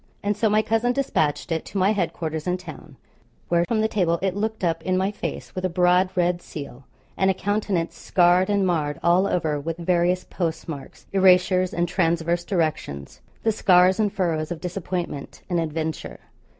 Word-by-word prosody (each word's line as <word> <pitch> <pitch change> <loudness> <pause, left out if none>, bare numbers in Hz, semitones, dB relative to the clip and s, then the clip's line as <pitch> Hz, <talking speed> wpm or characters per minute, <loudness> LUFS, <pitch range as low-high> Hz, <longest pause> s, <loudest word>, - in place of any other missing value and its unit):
And 205 +1 0
so 215 +1 +1
my 215 +1 +3
cousin 225 +3 +1
despatched 170 - 0
it 160 -1 -1
to 200 - -6
my 195 +2 +3
head 195 -5 0
quarters 160 -1 -4
in 180 0 +1
town, 155 -5 -11 0.5
where 170 0 +3
from 220 -2 +1
the 220 - +2
table 175 -6 +1
it 190 -1 0
looked 220 0 -3
up 165 -2 0
in 185 +2 0
my 190 +2 +1
face, 210 - -6
with 185 - -5
a 185 - +1
broad 180 +1 +3
red 175 -1 +1
seal, 140 -5 -9 0.3
and 190 - +2
a 190 - +2
countenance 200 -3 -1
scarred 180 +1 +3
and 200 -1 +2
marred 150 -5 -1
all 180 +3 +4
over 155 -6 0
with 165 +3 -4
various 175 +1 +1
post 165 -3 -3
marks, 145 -4 -8
erasures, 185 -1 +4
and 175 0 0
transverse 170 -1 0
directions, 155 - -3 0.2
the 225 - +3
scars 185 -2 +4
and 210 -2 +2
furrows 165 -5 -1
of 170 - -4
disappointment 175 -5 -5
and 175 - +2
adventure. 160 -1 -4
180 Hz, 185 wpm, -24 LUFS, 165-190 Hz, 0.5 s, all